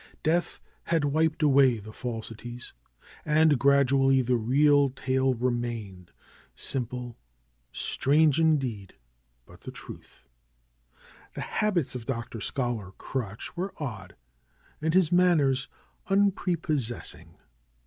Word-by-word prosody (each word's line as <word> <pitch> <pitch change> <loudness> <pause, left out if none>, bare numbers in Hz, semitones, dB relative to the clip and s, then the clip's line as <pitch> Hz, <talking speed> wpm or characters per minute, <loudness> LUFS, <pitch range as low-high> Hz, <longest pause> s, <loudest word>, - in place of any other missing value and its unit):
Death 170 +3 0 0.3
had 165 -3 +1
wiped 155 +2 +1
away 135 -4 +5
the 110 +1 -10
falsities. 120 0 -7 0.5
And 155 -2 +3
gradually 135 -1 +4
the 125 +1 +1
real 140 +4 +3
tale 130 0 0
remained, 120 -7 -3 0.4
simple, 125 -2 -4 0.5
strange 150 +2 +2
in 160 -1 +4
deed, 110 -8 -5 0.5
but - - -17
the - - -8
truth. - - -12 1.1
The - - -5
habits 190 -10 -1
of 120 -3 -7
Dr. 115 -3 -4
Scholar 120 -6 -3
Crutch 110 -5 -5
were 185 +3 -4
odd, 110 -10 -6 0.7
and 160 +2 0
his 185 -3 +4
manners 150 -7 +3 0.4
unprepossessing. 175 - -1
135 Hz, 105 wpm, -27 LUFS, 120-155 Hz, 1.1 s, away